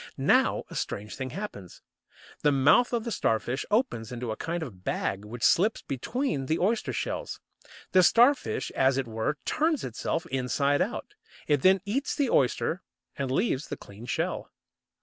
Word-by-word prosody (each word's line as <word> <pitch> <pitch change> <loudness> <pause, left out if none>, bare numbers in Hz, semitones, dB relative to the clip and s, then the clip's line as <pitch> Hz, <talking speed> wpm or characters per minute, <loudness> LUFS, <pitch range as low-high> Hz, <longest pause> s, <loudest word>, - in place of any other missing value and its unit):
Now - - +3
a - - -8
strange 105 +1 -4
thing 130 -1 -4
happens. 130 - -8 0.6
The 150 - +4
mouth 140 - +4
of 235 -2 0
the 235 - -4
Starfish 120 - 0
opens 210 - 0
into 120 -2 -4
a - - -2
kind 170 +5 -3
of 95 -10 -10
bag 95 +2 -2
which 110 +3 -8
slips 210 +6 +3
between 140 - -2
the 160 - +1
oyster 215 +5 0
shells. - - -3 0.5
The 185 - +6
Starfish, 245 +8 +3
as 130 0 +2
it 135 - 0
were, 115 +6 -2
turns 315 -2 +1
itself 125 +6 -2
inside 140 +2 +1
out! - - -3 0.3
It 145 -3 +2
then 190 0 +5
eats 260 +8 -1
the 280 -5 +1
oyster 140 +7 +1 0.3
and 140 -2 -3
leaves 140 - 0
the - - -5
clean 105 +4 -12
shell. - - -2
140 Hz, 165 wpm, -28 LUFS, -, 0.6 s, The